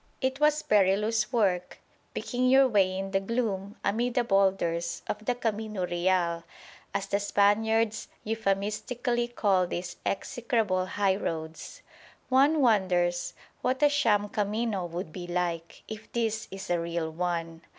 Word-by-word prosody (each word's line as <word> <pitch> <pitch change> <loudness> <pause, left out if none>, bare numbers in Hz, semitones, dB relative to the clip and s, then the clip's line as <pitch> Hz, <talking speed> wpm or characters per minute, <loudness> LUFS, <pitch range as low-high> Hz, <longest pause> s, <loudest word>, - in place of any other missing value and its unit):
It 260 +1 -1
was 300 0 +3
perilous 210 +2 +2
work 190 -7 +1 0.4
picking 255 0 0
your 265 +1 +6
way 195 -5 +2
in 195 0 -4
the 195 - +2
gloom 200 -2 -2
amid 240 +3 0
the 245 - +3
boulders 190 -5 +1
of 210 - -4
the 245 - +1
"camino 215 -4 -2
real," 175 -1 0 0.5
as 200 0 -2
the 200 - 0
Spaniards 215 +2 +2 0.2
euphemistically 225 +3 -1
call 195 -6 +1
these 175 0 -5
execrable 220 -6 -1
highroads. 190 - -2 0.5
One 280 +4 +4
wonders 180 -7 +2 0.3
what 260 +3 0
a 295 - +7
sham 210 -8 +2
"camino" 210 -2 -1
would 170 -1 -5
be 175 -2 -6
like, 175 -1 -3
if 220 0 -9
this 225 -2 -1
is 195 -1 -6
a 175 - +2
"real" 170 -1 -2
one. 165 -1 -3
200 Hz, 135 wpm, -28 LUFS, 180-230 Hz, 0.5 s, a